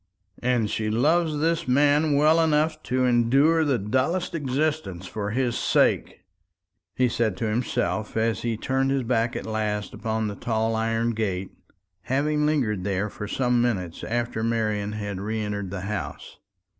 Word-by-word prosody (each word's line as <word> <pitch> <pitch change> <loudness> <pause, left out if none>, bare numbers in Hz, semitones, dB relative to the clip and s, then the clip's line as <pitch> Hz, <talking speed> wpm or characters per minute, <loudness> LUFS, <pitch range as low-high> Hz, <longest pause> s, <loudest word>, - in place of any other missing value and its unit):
"And 120 -3 +1
she 110 +1 -2
loves 155 +7 +2
this 165 0 +1
man 145 +3 +3
well 155 +3 +5
enough 155 0 +1
to 130 +1 +2
endure 135 +7 +4
the 140 -4 +2
dullest 130 - 0
existence 145 - -2
for 105 +2 -4
his 120 +1 0
sake," - - +1 0.7
he 130 - +3
said 110 -5 0
to 115 - -2
himself 110 -2 -1
as 110 -2 +1
he 115 -2 -1
turned 135 +3 0
his 135 -1 +1
back 115 0 0
at - - -4
last 105 -1 -2
upon 110 -1 -2
the 105 - -3
tall 110 +1 -1
iron 115 +1 0
gate, 100 -4 -2 0.5
having 150 +6 +1
lingered 115 -11 0
there 100 +1 -1
for 105 - -6
some 125 +1 +1
minutes 95 -9 -2
after 120 -1 -2
Marian 110 -3 -1
had 100 -3 -4
re 110 +2 -2
entered 105 -2 -3
the 95 0 -5
house. 105 +1 -5
115 Hz, 155 wpm, -25 LUFS, 105-140 Hz, 0.7 s, well